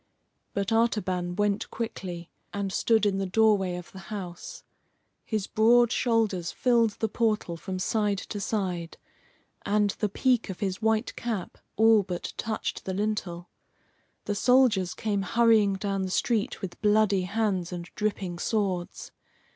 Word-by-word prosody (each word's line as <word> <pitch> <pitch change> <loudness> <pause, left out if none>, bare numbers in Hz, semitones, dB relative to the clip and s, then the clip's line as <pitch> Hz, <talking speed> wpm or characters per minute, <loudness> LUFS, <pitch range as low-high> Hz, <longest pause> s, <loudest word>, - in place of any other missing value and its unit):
But 200 +2 -1
Artaban 190 -6 +1
went 205 0 0
quickly 180 -7 -5 0.2
and 200 -1 -2
stood 225 -2 +2
in 195 -1 +1
the 195 - -1
doorway 200 -2 +3
of 180 -1 -8
the 190 - -10
house. 185 -5 -7 0.6
His 215 -4 -2
broad 235 +2 +4
shoulders 220 -9 +1
filled 235 -4 +2
the 220 - +1
portal 215 -5 0
from 185 +3 -5
side 205 +2 0
to 205 - -6
side, 185 -5 -3 0.7
and 205 0 +2
the 210 - 0
peak 245 +2 +1
of 190 - -6
his 190 +1 -2
white 220 +1 +1
cap 220 -7 -4 0.2
all 220 0 +6
but 180 -3 -5
touched 220 -1 -3
the 190 - -3
lintel. 195 -4 -3 0.7
The 205 - -1
soldiers 225 -5 +3
came 205 -3 -1
hurrying 220 -1 +3
down 195 0 -2
the 190 - -2
street 215 +2 0
with 175 -2 -6
bloody 210 -2 +3
hands 195 -3 -1
and 175 -1 -6
dripping 195 -4 -2
swords. 190 -5 -2
205 Hz, 145 wpm, -27 LUFS, 185-220 Hz, 0.7 s, all